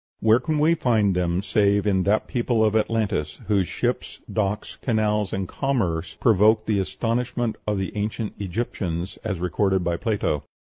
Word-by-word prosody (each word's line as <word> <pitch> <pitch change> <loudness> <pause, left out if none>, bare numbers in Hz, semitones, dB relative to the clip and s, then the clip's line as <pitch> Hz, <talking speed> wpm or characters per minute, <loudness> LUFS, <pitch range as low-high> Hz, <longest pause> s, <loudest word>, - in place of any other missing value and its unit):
Where 110 +2 +5
can 155 +4 -1
we 155 +3 +4
find 110 - +2
them 90 +1 0
save 100 -1 +2
in 95 -2 +2
that 105 +2 +2
people 120 -2 +1
of 105 0 +1
Atlantis, 110 -9 0
whose 100 -4 +2
ships, - - -2
docks, 105 -1 -2
canals, 105 -4 +1
and 95 -1 -2
commerce 95 - -1
provoked 110 0 +4
the 105 -2 +1
astonishment 115 +4 -1
of 105 -1 +1
the 95 +1 -3
ancient 105 +1 -2
Egyptians, 95 -3 -3
as 100 -4 -2
recorded 95 +1 +1
by 85 0 0
Plato. 95 -9 -1
105 Hz, 155 wpm, -24 LUFS, 95-115 Hz, -, Where